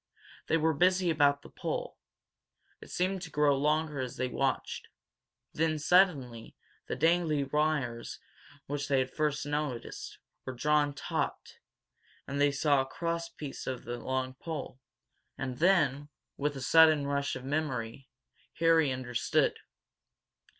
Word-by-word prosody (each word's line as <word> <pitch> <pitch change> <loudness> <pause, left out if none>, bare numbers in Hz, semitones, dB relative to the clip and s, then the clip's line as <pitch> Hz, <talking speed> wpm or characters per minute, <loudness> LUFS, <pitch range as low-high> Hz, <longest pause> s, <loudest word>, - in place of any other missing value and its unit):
They 165 - +3
were 160 0 +2
busy 180 +3 +3
about 145 -2 +3
the - - -12
pole. - - -4 0.8
It - - -12
seemed 185 +1 -1
to 175 - -7
grow 150 -2 +3
longer 150 +1 0
as 130 -1 -4
they 130 - 0
watched. 135 +2 -2 0.7
Then, 160 0 +1
suddenly, 150 -8 +2 0.3
the - - -2
dangling 160 -4 +2
wires 145 -6 0 0.7
they 140 - +2
had 130 0 0
first 150 -2 -1
noticed 145 -4 -4 0.3
were 130 - -5
drawn 150 +2 +2
taut, - - -4 0.7
and 140 0 -2
they 145 0 +4
saw 140 -1 +3
a - - -3
cross 170 +2 -3
piece 145 -4 -8
on 130 -2 -4
the 120 0 -5
long 130 0 -2
pole. 140 -2 -6 0.6
And 130 -2 -4
then, 145 -6 +3 0.3
with 145 0 -1
a - - -6
sudden 155 +1 +6
rush 140 0 -1
of 130 - -7
memory, 135 -4 -3 0.5
Harry 165 -3 +4
understood. 125 -2 0
145 Hz, 135 wpm, -30 LUFS, 130-160 Hz, 0.8 s, sudden